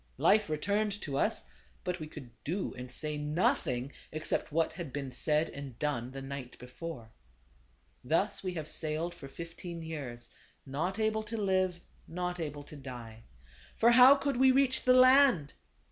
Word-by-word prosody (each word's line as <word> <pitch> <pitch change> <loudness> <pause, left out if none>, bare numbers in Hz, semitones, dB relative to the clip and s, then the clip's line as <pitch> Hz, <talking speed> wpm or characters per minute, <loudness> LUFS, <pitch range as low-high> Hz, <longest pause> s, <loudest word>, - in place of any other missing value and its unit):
Life 210 -2 +4
returned 200 +6 0
to 140 -4 -3
us; 135 - +1 0.4
but 180 0 -2
we 155 - -5
could 140 -6 -10
do 180 +6 -2
and 125 0 -8
say 150 +2 -3
nothing 150 -4 0 0.2
except 155 0 -2
what 160 +1 +1
had 165 -4 -6
been 135 -1 -4
said 150 +5 +1
and 140 -4 -8
done 135 -5 -1
the 135 +1 -7
night 135 -2 -7
before. 125 -2 -8 0.5
" - - -36
Thus 195 +6 +2
we 185 -1 -3
have 155 -2 -4
sailed 160 +3 -1
for 155 -5 -10
fifteen 165 +3 -8
years; 130 -7 -6 0.3
not 160 +9 -2
able 220 0 +1
to 220 +1 -5
live, 185 -3 +1 0.3
not 180 +1 -3
able 145 -3 -4
to 150 - -12
die. 120 -5 -9 0.6
For 235 +1 +6
how 255 +3 +9
could 275 -2 -1
we 260 +1 +6
reach 260 0 +2
the 255 - +6
land 255 - +6
160 Hz, 165 wpm, -31 LUFS, 135-190 Hz, 0.6 s, how